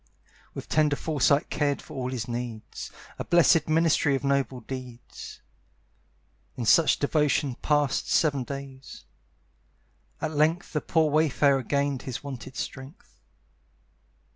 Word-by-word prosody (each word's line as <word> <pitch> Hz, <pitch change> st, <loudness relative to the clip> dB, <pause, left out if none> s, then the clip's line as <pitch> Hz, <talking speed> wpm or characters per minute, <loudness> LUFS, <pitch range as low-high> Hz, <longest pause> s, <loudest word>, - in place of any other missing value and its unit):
With -, -, -7 dB
tender 150 Hz, -2 st, +2 dB
foresight 145 Hz, -1 st, +1 dB
cared 145 Hz, -2 st, 0 dB
for -, -, -12 dB
all 130 Hz, -1 st, -3 dB
his 125 Hz, -4 st, -4 dB
needs, 120 Hz, -2 st, -6 dB, 0.3 s
A -, -, -2 dB
blessed 165 Hz, -2 st, +4 dB
ministry 155 Hz, -3 st, +3 dB
of 135 Hz, -, -3 dB
noble 140 Hz, -2 st, 0 dB
deeds. 125 Hz, -1 st, -9 dB, 1.2 s
In 120 Hz, -, -3 dB
such 160 Hz, +8 st, +5 dB
devotion 145 Hz, -2 st, +1 dB
passed 145 Hz, -3 st, +1 dB
seven 145 Hz, -5 st, +2 dB
days. 135 Hz, 0 st, -9 dB, 1.1 s
At 155 Hz, 0 st, -2 dB
length 160 Hz, +3 st, +1 dB
The 150 Hz, -, 0 dB
poor 160 Hz, -2 st, +1 dB
wayfarer 140 Hz, -2 st, +3 dB
gained 140 Hz, +1 st, -1 dB
his 130 Hz, 0 st, -6 dB
wonted 130 Hz, -2 st, -8 dB
strength. 135 Hz, +5 st, -8 dB
140 Hz, 120 wpm, -26 LUFS, 130-155 Hz, 1.2 s, such